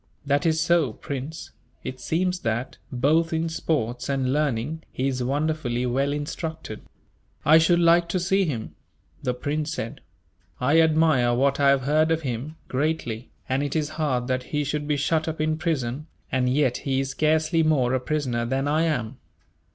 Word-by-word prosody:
"That 145 +3 +2
is 160 -1 +2
so, 160 -6 +2
Prince. 140 +6 -6 0.3
It 130 - -6
seems 180 +7 0
that, 115 0 -3
both 155 +7 +2
in 165 0 0
sports 125 -7 -2
and 135 -2 0
learning, 150 +1 -1
he 130 - -1
is 130 -2 -1
wonderfully 140 -2 -1
well 135 +3 +1
instructed." 150 -3 -5 0.6
"I 155 +2 +7
should 170 +2 +4
like 170 0 +4
to 185 - 0
see 195 +3 +2
him," 120 -9 -4 0.5
the 125 -1 -1
prince 150 +4 -2
said. 115 -7 -5 0.6
"I 145 +6 +4
admire 155 -7 +3
what 135 +2 +2
I 140 -1 +5
have 140 -1 +3
heard 155 +3 +3
of 165 0 0
him, 130 +4 -4
greatly, 130 -5 -2 0.2
and 130 +1 0
it 145 +1 -2
is 155 -2 0
hard 145 -6 -1
that 130 0 0
he 150 -1 -1
should 145 +1 -2
be 150 -1 +1
shut 155 +3 +1
up 160 -1 -3
in 155 0 +1
prison; 150 -4 -2 0.2
and 125 -1 +1
yet 130 -2 +2
he 135 -1 -1
is 135 0 -3
scarcely 155 +3 +2
more 140 -6 +2
a 130 - +2
prisoner 130 -4 -1
than 135 +4 -1
I 155 +3 +2
am." 125 -6 -2
145 Hz, 175 wpm, -25 LUFS, 130-160 Hz, 0.6 s, I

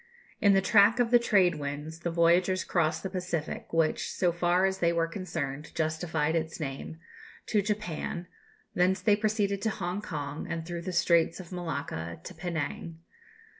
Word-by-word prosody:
In 200 -1 +6
the 195 -1 +3
track 210 +2 +5
of 240 -1 +2
the 240 - +7
trade 185 -8 +3
winds 150 +3 -5
the 170 - -2
voyagers 175 +2 +3
crossed 160 -2 0
the 190 - -2
Pacific, 180 -4 -4
which, 165 -1 +1
so 180 -2 +1
far 175 +2 +2
as 190 0 0
they 170 -1 +3
were 170 -1 +1
concerned, 150 -5 -5
justified 160 0 0
its 160 0 -2
name, 140 +2 -5 0.5
to 210 - +2
Japan; 200 -4 -3 0.5
thence 185 +2 +2
they 205 +2 +4
proceeded 205 -2 0
to 225 - +1
Hong 190 -1 -3
Kong, 150 -4 -5
and 165 -1 -3
through 170 0 -5
the 185 +2 -4
Straits 170 -1 +3
of 180 -1 -10
Malacca 140 - -4
to - - -8
Penang. 165 -1 -4
175 Hz, 170 wpm, -29 LUFS, 160-190 Hz, 0.5 s, the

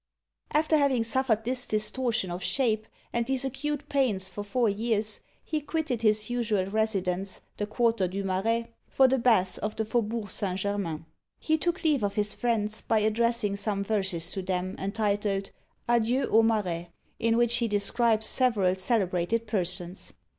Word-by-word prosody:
After 310 +1 +3
having 270 -5 +2
suffered 230 -2 +1
this 250 0 +1
distortion 220 -1 0
of 175 +1 -5
shape, 220 +1 0 0.3
and 235 - +1
these 265 0 +3
acute 290 +2 -3
pains 215 -10 0
for 205 +3 -5
four 230 +4 +1
years, 215 0 0 0.2
he 310 -1 -2
quitted 295 -6 -2
his 215 -1 +3
usual 230 -6 0
residence, 195 -3 -1 0.2
the 205 - -2
quarter 225 -3 +1
du 195 +2 -4
Marais, 225 +5 -1 0.2
for 265 - +4
the 265 +1 +1
baths 190 -7 +2
of 210 +1 -3
the 220 - -1
Fauxbourg 220 -2 -2
Saint 185 -2 -1
Germain. 190 -5 -3 0.3
He 315 - +1
took 350 +3 -1
leave 300 -5 +2
of 200 -1 -1
his 210 0 +3
friends, 215 -3 -1
by 225 - +1
addressing 220 0 +1
some 200 -1 -1
verses 190 -5 -1
to 195 - -3
them, 185 0 -2
entitled, 200 -1 -1 0.4
Adieu 240 +2 +2
aux 225 - +6
Marais; 185 -7 0 0.3
in 230 0 +2
which 235 0 +3
he 235 -1 +1
describes 220 +2 +2
several 215 -8 +2
celebrated 190 +1 0
persons. 180 -3 -1
215 Hz, 160 wpm, -27 LUFS, 195-240 Hz, 0.4 s, aux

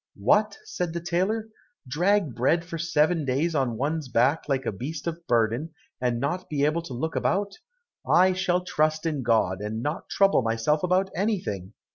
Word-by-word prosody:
"What!" 210 - +2
said 175 -2 -3
the 170 - -2
tailor, 190 +6 -1 0.4
"drag 175 +2 +1
bread 160 +9 +1
for 165 -1 -6
seven 160 0 +2
days 140 +6 0
on 130 -6 0
one's 150 +3 -2
back 130 +7 +2
like 135 -1 0
a - - 0
beast 145 +10 -6
of 170 0 -5
burden, 120 +7 +1 0.3
and 120 -2 0
not 160 +8 -2
be 145 -2 +1
able 155 +3 +1
to 165 -6 -8
look 160 +7 -3
about. 200 - -1 0.5
I 185 +1 +5
shall 180 -1 0
trust 155 -1 0
in 155 -4 -1
God, 110 -6 +1
and 110 +2 -4
not 150 +2 -4
trouble 195 -7 +3
myself 115 +6 0
about 185 +1 +1
anything! 170 - -2
155 Hz, 175 wpm, -26 LUFS, 125-175 Hz, 0.5 s, I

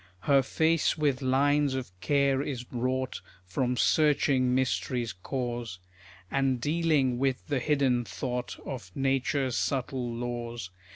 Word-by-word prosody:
Her 140 +3 +4
face 160 +5 +1
with 145 -3 +1
lines 140 +1 +2
of 130 -8 -4
care 140 +3 +2
is 130 -4 -4
wrought, 130 +1 -2 0.2
From 125 +7 -1
searching 140 -5 +3
mystery's 125 -3 0
cause, 120 +1 -4 0.5
And 135 -2 +1
dealing 145 -3 +1
with 135 -1 0
the 145 -3 0
hidden 130 -3 +2
thought 125 +5 -4
Of 120 -9 -6
nature's 135 -1 0
subtle 130 -2 -1
laws. 120 -3 -4
130 Hz, 120 wpm, -29 LUFS, 120-140 Hz, 0.5 s, Her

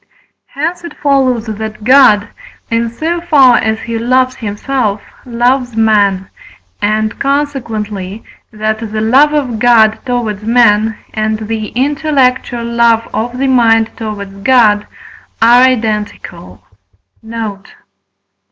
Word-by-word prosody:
Hence 335 +5 -4
it 335 -3 -10
follows 260 -5 +1
that 215 -1 -6
God, 230 -4 +5 0.4
in 230 0 0
so 325 +8 -3
far 275 -8 +4
as 220 0 -1
he 230 -1 -4
loves 255 +2 +1
himself, 215 0 -2 0.3
loves 245 0 0
man, 205 -4 +2 0.5
and, 215 +1 -1
consequently, 225 -8 -3 0.3
that 215 0 -2
the 220 -1 -5
love 260 +7 +3
of 265 -7 -2
God 220 -2 +4
towards 235 -5 -3
men, 220 -1 +2 0.2
and 215 0 -1
the 215 0 -4
intellectual 265 -3 0
love 235 -1 +1
of 240 +3 -3
the 270 - -1
mind 225 -4 +3
towards 205 -3 -6
God 215 -4 +3 0.5
are 235 +2 +5
identical. 210 - -2 0.6
Note. 220 -3 -7
230 Hz, 115 wpm, -13 LUFS, 215-255 Hz, 0.6 s, God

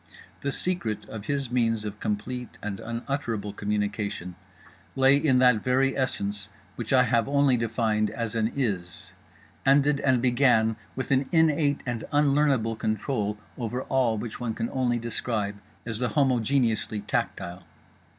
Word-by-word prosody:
The 140 - -2
secret 120 - -2
of 110 -2 -7
his 140 -3 -1
means 115 -3 +1
of 105 0 -6
complete 120 +4 -4
and 100 -2 -4
unutterable 115 -3 -3
communication 105 -3 -2 0.6
lay 135 +1 +6
in 140 -3 +3
that 125 -4 +4
very 135 +1 +2
essence 100 -6 0 0.3
which 115 -3 -5
I 130 -1 +6
have 120 -2 +2
only 140 -2 +4
defined 110 -2 0
as 115 -2 -4
an 115 0 0
IS; 95 -10 -3 0.5
ended 140 +1 +4
and 130 -3 +3
began 120 -3 +3 0.2
with 130 - -4
an 135 0 +3
innate 155 -3 +3
and 120 -3 -3
unlearnable 140 -6 +2
control 110 -1 -1 0.2
over 125 +2 -3
all 125 -4 +1
which 110 +1 -5
one 115 -2 -3
can 115 0 -3
only 125 -2 +1
describe 110 -3 -2 0.3
as 115 -2 -4
the 125 -1 0
homogeneously 120 -4 +1
tactile. 90 -2 -2
120 Hz, 140 wpm, -26 LUFS, 110-135 Hz, 0.6 s, lay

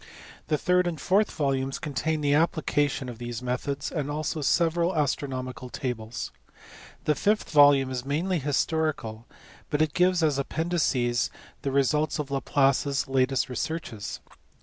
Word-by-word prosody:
The 150 - +1
third 180 +3 +2
and 165 -3 -3
fourth 200 +3 +2
volumes 135 -2 -1
contain 155 +1 -2
the 145 -1 +2
application 145 -3 +1
of 120 -2 -8
these 120 0 -5
methods, 140 +3 -2
and 145 -3 -2
also 155 +1 -2
several 170 +4 +2
astronomical 130 -3 -2
tables. 120 -3 -4 0.7
The 150 - +4
fifth 210 +8 0
volume 145 -3 +6
is 125 -1 -3
mainly 165 +6 0
historical, 145 -5 -1 0.4
but 145 - 0
it 155 -1 +2
gives 180 -1 +3
as 145 -3 +2
appendices 140 -6 0 0.3
the 140 - -1
results 140 +3 +2
of 145 -2 -4
Laplace 135 0 +2
s 140 -1 -1
latest 135 0 +1
researches. 125 -4 -4
145 Hz, 140 wpm, -27 LUFS, 130-160 Hz, 0.7 s, volume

